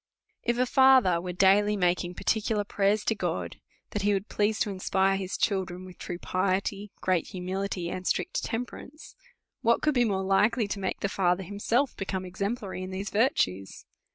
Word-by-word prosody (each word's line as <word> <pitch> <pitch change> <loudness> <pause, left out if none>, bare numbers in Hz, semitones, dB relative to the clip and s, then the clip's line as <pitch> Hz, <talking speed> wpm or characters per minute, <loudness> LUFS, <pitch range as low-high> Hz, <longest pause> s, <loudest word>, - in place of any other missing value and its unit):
If 240 0 0
a 250 - +3
father 255 -10 +5
was 180 0 -5
daily 205 +3 +4
making 180 -1 0
particular 215 +1 0
prayers 200 +1 +1
to - - +1
God, - - -3 0.3
that 210 - -2
he 205 +1 +2
would 195 +1 -2
please 210 +1 +1
to 205 - +1
in 190 - -7
spire 195 +1 +2
his 190 -1 -3
children 185 -3 -1
with 185 -1 -13
true 175 - -5
piety, 195 +3 -1
great 185 -3 +1
humility, 185 0 -3
and 185 0 -5
strict - - -1
temperance, 250 +5 -6 0.5
what 235 +1 +2
could 305 - +3
be 245 -2 +3
more 195 -4 0
likely 210 +4 +2
to 205 - -3
make 190 - -3
the - - +1
father 185 -1 +1
himself 225 +8 0
become 190 -1 -3
exemplary 200 +2 -4
in 185 - -5
these 195 +2 -5
virtues? 95 - 0
195 Hz, 180 wpm, -28 LUFS, 185-215 Hz, 0.5 s, father